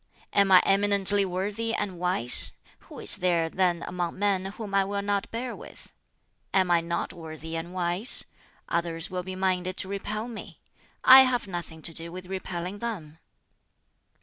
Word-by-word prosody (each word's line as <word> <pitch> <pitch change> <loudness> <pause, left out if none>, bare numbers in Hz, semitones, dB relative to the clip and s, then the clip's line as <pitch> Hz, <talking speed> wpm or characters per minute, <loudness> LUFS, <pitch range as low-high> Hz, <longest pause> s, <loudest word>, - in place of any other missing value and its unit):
Am 200 -1 +3
I 185 - +8
eminently 200 0 +3
worthy 205 +5 -2
and 190 -4 -3
wise? 180 -9 +3 0.3
who - - -14
is - - +2
there 170 -2 +1
then 180 -2 +1
among 175 -1 -4
men 195 -2 +1
whom 205 0 -8
I 195 0 +4
will 200 +1 -3
not 200 -1 -1
bear 240 +1 -5
with? - - -14 0.6
Am 185 -2 +3
I 170 -1 +4
not 170 +1 -3
worthy 160 -1 -8
and 165 +2 -5
wise? 180 +5 +1 0.4
others 170 +1 -1
will 180 -1 -3
be 185 +1 -7
minded 185 -1 -1
to - - -1
repel 210 +3 -3
me: 235 -3 -9 0.4
I 260 +1 +10
have 255 -2 +1
nothing 170 -3 -7
to 165 - +4
do 165 +1 -1
with 185 +1 -8
repelling 185 0 -5
them." 165 -10 -6
185 Hz, 165 wpm, -26 LUFS, 175-200 Hz, 0.6 s, I